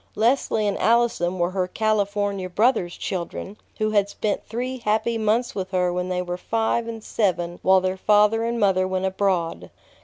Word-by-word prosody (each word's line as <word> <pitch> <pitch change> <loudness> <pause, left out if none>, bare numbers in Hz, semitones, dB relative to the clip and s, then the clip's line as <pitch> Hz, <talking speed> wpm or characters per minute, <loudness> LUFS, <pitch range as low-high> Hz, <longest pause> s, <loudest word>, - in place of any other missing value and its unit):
Leslie 225 -1 +1
and 200 -1 -1
Allison 225 -6 +2
were 175 0 0
her 185 -1 -1
California 205 -2 -1
brother's 195 -3 +1
children, 190 +2 -5 0.2
who 215 0 0
had 200 -1 +2
spent 205 0 -2
three 250 +3 -4
happy 220 +1 0
months 225 +2 0
with 190 -2 -4
her 180 -2 0
when 180 +1 -2
they 180 0 -1
were 180 0 -4
five 225 +3 -1
and 225 -1 -6
seven 175 -6 -1
while 190 0 +4
their 185 0 -1
father 210 +3 +3
and 235 0 -1
mother 190 -3 +2
went 185 0 -1
abroad. 185 - -1
200 Hz, 175 wpm, -23 LUFS, 185-220 Hz, 0.2 s, while